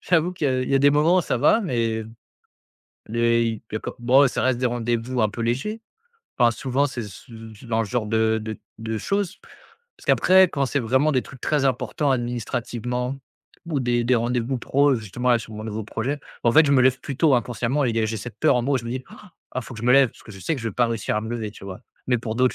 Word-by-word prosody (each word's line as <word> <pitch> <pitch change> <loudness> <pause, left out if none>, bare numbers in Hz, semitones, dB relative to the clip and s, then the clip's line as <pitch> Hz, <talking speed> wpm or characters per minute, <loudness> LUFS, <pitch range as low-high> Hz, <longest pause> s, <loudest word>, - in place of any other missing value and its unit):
j'avoue 175 0 +1
qu'il 165 -4 -2
y - - +2
a 130 0 0
il - - -4
y 135 - +3
a - - +5
des 145 +1 +5
moments 160 +5 +4
ça 155 - -1
va, 220 - +4
mais 115 - -1 1.0
les 115 +1 +2
y 115 -2 -3
il - - -7
y - - +1
a - - -1
co - - -6
bon, 130 +4 +5
ça - - -2
reste 130 -2 +1
des 125 - +1
rendez-vous 120 0 -1
un 105 - +3
peu 115 - -8
légers 135 - -2 0.6
enfin, 120 -2 +5
souvent 135 +4 0
c'est 130 -3 -5
ce 105 +4 -11 0.2
ce 120 +4 -14
dans 115 -1 0
le - - 0
genre 110 +1 -2
de 110 0 +1
de 110 -1 -6 0.2
de 110 0 -3
choses 200 - -2 0.6
parce - - -18
qu'après, 190 0 +6
quand 140 -4 -1
c'est 140 - -1
vraiment 130 +6 +2
des 130 - +1
trucs 130 - -13
très 150 -3 0
importants, 130 +2 0
administrativement, 120 +1 -3 0.5
ou 150 -5 -1
des 120 -1 +1
des 125 - +3
rendez-vous 120 +2 -1
pros, 140 +3 +2
justement 115 +3 -3
là, 120 - +4
sur 110 - -10
mon 110 - -7
nouveau 110 0 -4
projet, 130 +7 -3 0.3
bah, 115 - +5
en - - -1
fait, 160 +4 +7
je - - +2
me 130 - +5
lève 130 0 +3
plus 140 - -6
tôt 155 -4 +4
inconsciemment 125 +3 0
et 120 - +1
il 115 - -4
y - - +2
a 110 - +1
j'ai 110 +1 -3
cette 120 +3 -8
peur 155 - +4
en 120 - +1
moi 140 +2 0
où - - +2
je 120 - -8
me 115 - -4
dis: 130 +1 -3
«Ah, 210 -3 -15 0.3
il - - -8
faut 120 - -10
que 110 - -8
je - - -6
me 125 - +5
lève!» 135 -3 +6
parce - - -19
que 115 - -13
je 100 - -11
sais 165 - -1
que - - -6
je 115 - -1
vais - - -7
pas 120 0 +3
réussir 115 -2 -2
à - - +1
me 110 - -6
lever, 115 -3 -3
tu 105 - -13
vois? 95 -1 -8 0.3
Mais 125 -1 +2
pour 110 0 -5
d'autres 125 0 +2
125 Hz, 280 wpm, -23 LUFS, 115-135 Hz, 1.0 s, fait